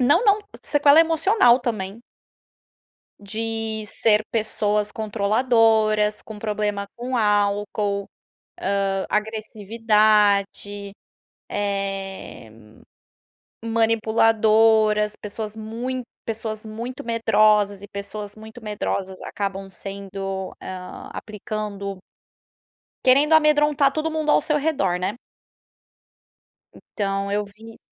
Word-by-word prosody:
Não, 285 - +4
não. 410 -1 +5 0.2
Sequela 290 +1 +5
emocional, 325 - +4
também. 215 -4 -4 1.2
De 220 +1 -3
ser 210 0 +3
pessoas 210 -2 0
controladoras, 215 0 +2
com 215 -1 -10
problema 210 -1 -2
com 250 +2 -3
álcool, 205 -1 0 0.8
hã, 195 0 -1
agressividade, 210 -2 +1 0.6
eh, 195 - -4 1.1
manipuladoras, 220 -1 +3
pessoas 210 0 -5
mui 235 +4 -4 0.2
pessoas 220 -1 -5
muito 235 +4 -6
medrosas 215 -3 +3
e 205 - -9
pessoas 205 +1 -7
muito 220 +2 -12
medrosas 200 -3 -4
acabam 195 -1 -4
sendo 195 0 -6
hã, 180 -1 -8
aplicando 210 -2 -5 1.1
Querendo 280 +4 +5
amedrontar 295 -2 +4
todo 310 +2 -1
mundo 310 -1 0
ao - - +5
seu 300 - +1
redor, 270 - 0
né? 190 +6 -3 1.6
Então 195 -1 -3
eu 210 +1 0
vi 220 +3 -14
215 Hz, 90 wpm, -23 LUFS, 200-230 Hz, 1.6 s, não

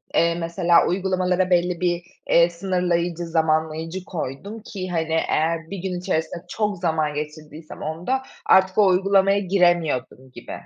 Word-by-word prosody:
eee, 170 0 +3
mesela 170 0 +2
uygulamalara 185 0 0
belli 180 -1 +1
bir, 175 -1 0 0.3
eee, 170 0 +5
sınırlayıcı, 175 -1 -1
zamanlayıcı 160 +2 -1
koydum 180 +6 -6
ki, 190 -4 -6
hani, 165 -2 -1 0.2
eğer 165 +1 0
1 200 - -5
gün 180 -1 -4
içerisinde 170 0 -3
çok 210 +1 -2
zaman 160 -3 0
geçirdiysem 150 +1 -8
onda, 170 - -2 0.2
artık 190 0 +4
o 210 - +6
uygulamaya 195 +1 +3
giremiyordum 175 -9 0
gibi. - - -11
175 Hz, 135 wpm, -23 LUFS, 160-185 Hz, 0.3 s, o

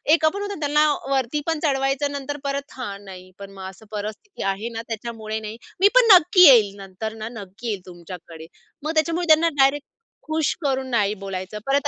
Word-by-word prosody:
एक 320 - -1
पण 400 - -4
होतं 405 -3 -5
त्यांना 300 +1 +3 0.2
वरतीपण 290 +4 -1
चढवायचं 270 -1 0
नंतर 285 +1 -5
परत 280 +1 -3
हा 205 -6 -5
नाही 185 -2 -12
पण 200 0 -9
मग 190 -1 -8
असं 190 +3 -15
परिस्थिती 215 - -6
आहे 210 +4 -6
ना 225 -1 -5
त्याच्यामुळे 220 -1 -5
नाही. 215 +1 -7 0.2
मी 390 - +7
पण - - +7
नक्की 360 +1 +4
येईल 220 -7 +6
नंतर 195 +3 -6
ना 220 - -4
नक्की 200 +5 -10
येईल 205 -4 -2
तुमच्याकडे. 170 -2 -11 0.4
मग 315 - -1
त्याच्यामुळे 335 +2 0
त्यांना 320 +1 +5
डायरेक्ट 280 +1 +1 0.4
खुश 315 -1 0
करून 265 -3 -1
नाही 210 -4 +1
बोलायचं 195 +1 -5
परत 280 +1 +1
250 Hz, 180 wpm, -22 LUFS, 200-295 Hz, 0.4 s, मी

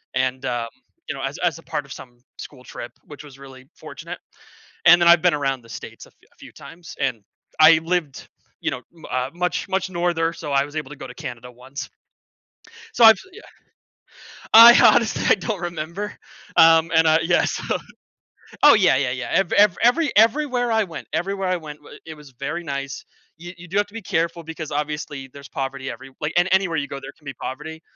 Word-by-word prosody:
and, 130 +1 -1
um 120 -2 -2 0.4
you - - -2
know, - - -8
as - - -4
as - - -1
a - - -17
part - - -4
of - - -16
some 120 -1 -13 0.2
school 130 -3 -11
trip, 120 - -9
which 150 0 -12
was 135 -2 -14
really 130 -1 -14
fortunate, - - -9 0.7
and 175 +1 +7
then 170 - +4
I've 170 -1 +6
been 180 -3 +3
around 135 -3 -2
the 115 - -19
states 115 - -10
a - - -18
f - - -27 0.2
a - - -32
few - - -14
times, 170 -1 -12
and 125 -6 -2 0.4
I 160 +1 +8
lived, 165 -5 -3 0.3
you - - -2
know, 125 - -6
n 165 - -17
uh, 130 +1 -2
much, 180 +1 -2
much 190 0 -1
norther, 170 -2 -1
so 160 -3 -8
I 140 0 +2
was 145 +1 -12
able 150 -3 -4
to 150 - -9
go 145 - -9
to - - -11
Canada 125 -4 -8
once. 130 +3 -9 1.1
So 235 - +4
I've 225 0 +9
yeah. 440 +4 -13 1.1
I 230 +2 +11 0.2
honestly, 230 -2 0
I - - +6
don't 215 -5 -4
remember, 175 +4 -5 0.4
um, 165 0 +6
and, 160 0 +4
uh, 160 0 +5
yeah, 170 +1 +2
so - - -2 0.9
oh 295 - +9
yeah, 190 -10 +4
yeah, 135 -2 0
yeah, 125 0 -5
ev 195 -3 +1
ev 205 -4 +5
every 285 +6 +3
everywhere 245 +2 +2
I 220 -1 +2
went 170 -5 -9
everywhere 195 +1 -2
I 185 - 0
went, 150 -3 -10
w 145 - -14
it 160 - -8
was 150 -2 -15
very 170 +5 -4
nice. 140 -3 -6 0.3
You 175 +2 -10
you 175 +1 -12
do 190 +4 -3
have 205 0 +1
to 205 - -22
be 230 - -7
careful, 170 0 -2
because 160 -1 -7
obviously, 150 -2 -4
there's 140 -1 -12
poverty 135 0 -5
everywh 135 0 -8
like, 150 0 -3
and 175 +1 +3
anywhere 190 -3 +2
you 145 -1 -2
go, 140 - -7
there 135 - -9
can 150 - -26
be 135 - -6
poverty, 160 +6 -8
160 Hz, 210 wpm, -22 LUFS, 140-180 Hz, 1.1 s, I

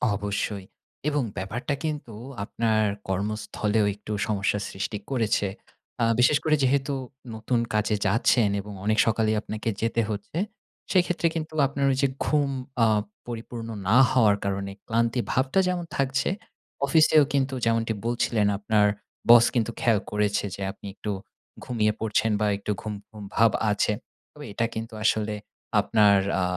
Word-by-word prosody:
অবশ্যই। 100 -1 -3 0.4
এবং 145 -3 0
ব্যাপারটা 115 +9 -3
কিন্তু 150 -7 -4 0.3
আপনার 110 0 +1 0.3
কর্মস্থলেও 105 +2 0
একটু 105 +1 -9 0.2
সমস্যার 105 -1 0
সৃষ্টি 95 +2 -3
করেছে। 110 -5 +1 0.6
আ - - +5
বিশেষ 130 +4 +5
করে 155 - +4
যেহেতু 140 +2 +2 0.4
নতুন 115 +2 0
কাজে 105 0 +1
যাচ্ছেন 115 +2 +3
এবং 105 +1 -9
অনেক 110 +1 +2
সকালেই 110 -1 +2
আপনাকে 110 +1 -4
যেতে 115 0 +1
হচ্ছে, 105 +9 -5 0.5
সেইক্ষেত্রে 175 -2 +2
কিন্তু 160 -1 -4
আপনার 140 0 -1
ঐযে 135 +1 +2 0.2
ঘুম 145 -2 +2 0.3
আ - - +7 0.4
পরিপূর্ণ 115 0 -6 0.2
না 115 - +5
হওয়ার 110 -6 +4
কারণে 100 0 -2 0.2
ক্লান্তি 115 +2 +1
ভাবটা 130 +8 +2
যেমন 180 -1 -1
থাকছে, 135 +2 +1 0.6
অফিসেও 155 +1 +5
কিন্তু 135 -1 +1
যেমনটি 115 0 +1
বলছিলেন 115 -3 +1
আপনার 105 0 +3 0.4
boss 120 0 +9
কিন্তু 115 -1 +1
খেয়াল 115 -4 +3
করেছে 105 -1 +1
যে - - -10
আপনি 100 - -15
একটু 105 - -4 0.5
ঘুমিয়ে 110 -3 +1
পড়ছেন 110 0 +1
বা 105 - +2
একটু 105 - -4
ঘুম, 110 - -4 0.2
ঘুম 105 -2 -10
ভাব 115 0 +5 0.2
আছে। 105 +1 +1 0.4
তবে 150 -1 -10
এটা 115 +3 0
কিন্তু 115 +1 -5
আসলে 110 -1 +1 0.5
আপনার 105 -1 +4 0.3
আ - - +2
115 Hz, 140 wpm, -26 LUFS, 105-130 Hz, 0.6 s, boss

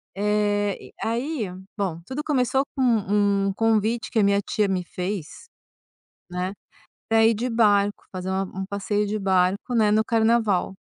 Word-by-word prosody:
Eh, 205 0 +1
e - - -12
e - - -23
aí 235 - -2 0.3
bom, 185 -5 -2
tudo 290 +3 -4
começou 265 -2 +1
com 265 - -2
um 205 -4 +2
convite 225 +1 +1
que 225 - +1
a - - +4
minha 200 0 +3
tia 210 +1 0
me 185 -2 -1
fez, 180 - -6 0.8
né, 180 +2 -3 0.6
pra 225 0 +4
ir 225 - +4
de 245 +4 -2
barco, 205 -3 +2
fazer 185 0 -5
a 190 0 0
um 190 +1 -6
passeio 205 +1 -1
de 215 +1 -2
barco, 190 +4 +1
né, 215 -2 +4
no 215 +1 +3
carnaval. 220 -5 +2
205 Hz, 165 wpm, -24 LUFS, 195-225 Hz, 0.8 s, a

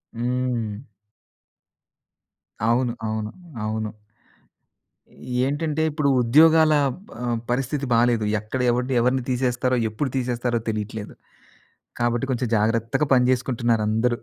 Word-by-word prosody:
హ్మ్. 120 -1 -2 1.8
అవును, 120 +1 +2
అవును, 110 0 -3 0.3
అవును. 110 0 -3 1.5
ఏంటంటే 150 +2 -1
ఇప్పుడు 150 -1 0
ఉద్యోగాల 155 +5 +5 0.5
ఆహ్, 120 -1 -1
పరిస్థితి 135 +3 -1
బాలేదు. 115 -1 +3
ఎక్కడ 110 +5 -4
ఎవడిని 125 +2 -1
ఎవరిని 125 +1 +1
తీసేస్తారో 125 0 0
ఎప్పుడు 130 +6 -2
తీసేస్తారో 120 -1 -1
తెలీట్లేదు. 105 0 -4 0.9
కాబట్టి 120 +1 0
కొంచెం 125 -1 -1
జాగ్రత్తగా 115 +6 +1
పని 125 -1 +4
జేసుకుంటున్నారు 120 -3 +1
అందరూ. 120 +2 +1
120 Hz, 95 wpm, -23 LUFS, 115-130 Hz, 1.8 s, ఉద్యోగాల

